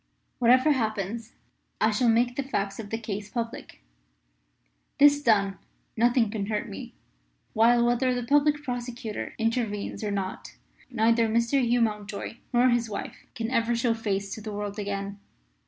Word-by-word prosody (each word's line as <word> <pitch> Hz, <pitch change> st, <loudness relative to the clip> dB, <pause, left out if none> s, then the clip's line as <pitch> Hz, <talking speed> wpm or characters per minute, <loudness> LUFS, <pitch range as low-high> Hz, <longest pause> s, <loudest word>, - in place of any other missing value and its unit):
Whatever 255 Hz, +5 st, +5 dB
happens 220 Hz, -2 st, -2 dB, 0.5 s
I 220 Hz, -, +3 dB
shall 235 Hz, +3 st, +2 dB
make 240 Hz, +2 st, +2 dB
the 280 Hz, -, 0 dB
facts 200 Hz, -7 st, -3 dB
of 210 Hz, -2 st, -6 dB
the 225 Hz, -, -2 dB
case 210 Hz, -2 st, -5 dB
public. 230 Hz, -, -6 dB, 1.1 s
This 290 Hz, 0 st, +6 dB
done, 200 Hz, -6 st, +2 dB, 0.4 s
nothing 235 Hz, -1 st, +3 dB
can 205 Hz, -3 st, -3 dB
hurt 210 Hz, -1 st, -2 dB
me; 95 Hz, -, -8 dB, 0.6 s
while, 235 Hz, +2 st, +4 dB
whether 245 Hz, +2 st, +2 dB
the 245 Hz, -1 st, -1 dB
Public 290 Hz, +2 st, +3 dB
Prosecutor 245 Hz, -4 st, -5 dB
intervenes 225 Hz, -3 st, -2 dB
or 210 Hz, -, -1 dB
not, 195 Hz, -2 st, -4 dB, 0.3 s
neither 230 Hz, -1 st, +3 dB
Mr. 235 Hz, +4 st, +2 dB
Hugh 240 Hz, 0 st, +2 dB
Mountjoy 210 Hz, 0 st, -2 dB
nor 245 Hz, 0 st, +4 dB
his 240 Hz, -2 st, +1 dB
wife 205 Hz, -, -7 dB
can 230 Hz, -1 st, -3 dB
ever 235 Hz, -1 st, +1 dB
show 235 Hz, 0 st, +1 dB
face 200 Hz, -3 st, -2 dB
to 220 Hz, -, -7 dB
the 215 Hz, 0 st, -6 dB
world 205 Hz, 0 st, -4 dB
again. 200 Hz, 0 st, -4 dB
230 Hz, 155 wpm, -27 LUFS, 210-245 Hz, 1.1 s, This